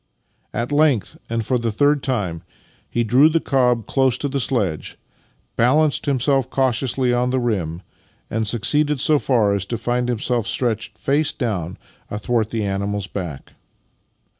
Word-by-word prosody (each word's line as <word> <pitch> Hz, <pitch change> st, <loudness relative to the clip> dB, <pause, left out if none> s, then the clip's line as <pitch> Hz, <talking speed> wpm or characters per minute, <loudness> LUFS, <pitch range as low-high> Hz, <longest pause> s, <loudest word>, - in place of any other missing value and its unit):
At 120 Hz, +5 st, -3 dB
length, 145 Hz, -7 st, +2 dB
and 115 Hz, -1 st, -2 dB
for 125 Hz, +1 st, +1 dB
the 115 Hz, -1 st, -1 dB
third 145 Hz, +6 st, +2 dB
time, 100 Hz, -12 st, -2 dB, 0.5 s
he 120 Hz, -, 0 dB
drew 130 Hz, +7 st, +5 dB
the 165 Hz, +1 st, +2 dB
cob 125 Hz, -6 st, +1 dB
close 130 Hz, -2 st, +1 dB
to 145 Hz, -, -2 dB
the 140 Hz, 0 st, -2 dB
sledge, 105 Hz, -, -1 dB, 0.6 s
balanced 145 Hz, +6 st, +2 dB
himself 135 Hz, -1 st, +1 dB
cautiously 130 Hz, -1 st, +1 dB
on 125 Hz, +1 st, +1 dB
the 130 Hz, +1 st, +1 dB
rim, 95 Hz, -8 st, -2 dB, 0.4 s
and 110 Hz, 0 st, -1 dB
succeeded 145 Hz, +6 st, +2 dB
so 150 Hz, +2 st, +3 dB
far 115 Hz, -8 st, +2 dB
as 100 Hz, -2 st, 0 dB
to 115 Hz, -, -2 dB
find 125 Hz, +2 st, -1 dB
himself 120 Hz, -1 st, -1 dB
stretched 110 Hz, -3 st, -2 dB
face 145 Hz, +2 st, +1 dB
downv^^ards 95 Hz, -, -3 dB, 0.3 s
athwart 110 Hz, +1 st, -1 dB
the 115 Hz, -2 st, -2 dB
animal's 100 Hz, 0 st, -2 dB
back. 85 Hz, -8 st, -6 dB
120 Hz, 150 wpm, -21 LUFS, 105-135 Hz, 0.6 s, drew